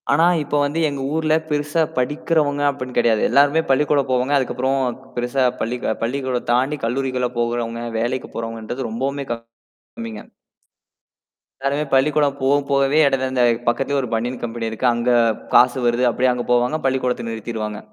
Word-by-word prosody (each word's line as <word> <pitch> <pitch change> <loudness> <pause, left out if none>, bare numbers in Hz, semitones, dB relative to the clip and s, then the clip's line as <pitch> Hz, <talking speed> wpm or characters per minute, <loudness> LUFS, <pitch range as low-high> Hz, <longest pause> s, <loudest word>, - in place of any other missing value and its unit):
ஆனா, 160 +4 +4 0.2
இப்ப 145 0 -3
வந்து 145 +3 -1
எங்க 140 -2 -4
ஊர்ல 155 -1 +1 0.2
பெருசா 150 +2 0 0.2
படிக்கிறவங்க 145 +2 0
அப்டின்னு 130 -3 -5
கெடையாது. 115 -2 +3
எல்லாருமே 145 +5 +4
பள்ளிக்கூட 145 +1 +3
போவாங்க. 130 +2 +1
அதுக்கப்பறம் 130 0 -1 0.2
பெருசா 125 +2 0 0.2
பள்ளி 120 +2 -1 0.3
பள்ளிக்கூட 130 +1 -1
தாண்டி 130 +5 +1
கல்லூரிகள்ல 125 0 -1
போகுறவங்க, 120 0 -2 0.2
வேலைக்கு 125 +3 -2
போறவங்கன்றது 115 +2 -4
ரொம்பவுமே 135 +5 -3 0.5
கம்மிங்க. 115 -2 -9 1.4
எல்லாருமே 140 +2 -1
பள்ளிக்கூடம் 145 +1 +3
போ 130 - +1 0.2
போகவே, 140 +2 +3
இட 135 -1 +2
அந்த 125 -1 +2 0.2
பக்கத்திலயே, 135 +4 +1
ஒரு 125 - -4
பனியேன் 120 +3 -2
கம்பெனி 115 -1 -3
இருக்கு. 110 +3 -4
அங்க 120 +1 -1 0.5
காசு 125 +1 +6
வருது 120 +1 +2
அப்படியியே 125 +2 +2
அங்க 120 -1 -4
போவாங்க. 125 +5 +2
பள்ளிக்கூடத்த 130 -3 0
நிறுத்திருவாங்க. 110 -1 -5
130 Hz, 140 wpm, -21 LUFS, 120-140 Hz, 1.4 s, காசு